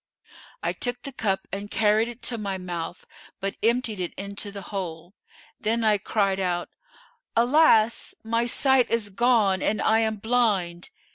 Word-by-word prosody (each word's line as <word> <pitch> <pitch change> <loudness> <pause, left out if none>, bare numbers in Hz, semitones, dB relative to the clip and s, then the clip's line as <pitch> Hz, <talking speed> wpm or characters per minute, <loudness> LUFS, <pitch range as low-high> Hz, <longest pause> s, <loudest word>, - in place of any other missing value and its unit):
I - - 0
took 245 0 -3
the 275 - -5
cup 205 -6 -1
and 200 +1 -5
carried 215 +1 +3
it 240 0 -9
to 235 -2 -3
my 200 -2 -3
mouth 175 -1 -5 0.3
but 195 0 -3
emptied 230 -2 +1
it 180 -2 -3
into 200 +1 -5
the 200 -1 -8
hole; 175 -2 -5 0.5
then 225 +2 0
I 210 -2 +3
cried 195 -1 0
out, 175 -2 -1 0.7
'Alas! 235 -2 +4
my 230 +1 0
sight 265 +1 +3
is 220 -3 0
gone 210 -3 +3
and 215 - +1
I 220 0 +3
am 220 -1 +1
blind! 205 -6 0
215 Hz, 155 wpm, -25 LUFS, 195-230 Hz, 0.7 s, Alas